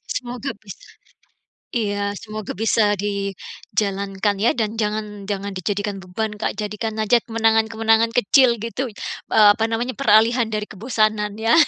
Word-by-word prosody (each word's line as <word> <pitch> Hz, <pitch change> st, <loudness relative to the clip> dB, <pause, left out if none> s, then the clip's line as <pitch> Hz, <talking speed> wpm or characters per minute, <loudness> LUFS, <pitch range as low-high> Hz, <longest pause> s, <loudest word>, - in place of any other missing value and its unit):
Semoga 250 Hz, +2 st, -4 dB
bis 200 Hz, -4 st, -9 dB, 1.0 s
iya, 205 Hz, -4 st, -1 dB
semoga 215 Hz, -2 st, -7 dB
bisa 225 Hz, 0 st, +2 dB, 0.2 s
dijalankan 200 Hz, 0 st, -2 dB
ya, 235 Hz, -, +5 dB
dan 220 Hz, 0 st, 0 dB
jangan 210 Hz, -2 st, -3 dB
jangan 200 Hz, 0 st, -3 dB
dijadikan 200 Hz, +2 st, -3 dB
beban, 210 Hz, +4 st, -3 dB
Kak, 210 Hz, 0 st, -3 dB
jadikan 215 Hz, +1 st, -3 dB
aja 220 Hz, +2 st, +3 dB
kemenangan-kemenangan 225 Hz, 0 st, +2 dB
kecil 245 Hz, +1 st, +4 dB
gitu, 230 Hz, +3 st, -4 dB, 0.4 s
eee, 215 Hz, -2 st, +7 dB
apa 225 Hz, -, -1 dB
namanya, 240 Hz, +3 st, -2 dB
peralihan 230 Hz, -1 st, +3 dB
dari 215 Hz, -1 st, -2 dB
kebosanan 215 Hz, -1 st, -1 dB
ya. 225 Hz, +6 st, +3 dB
215 Hz, 130 wpm, -21 LUFS, 205-225 Hz, 1.0 s, eee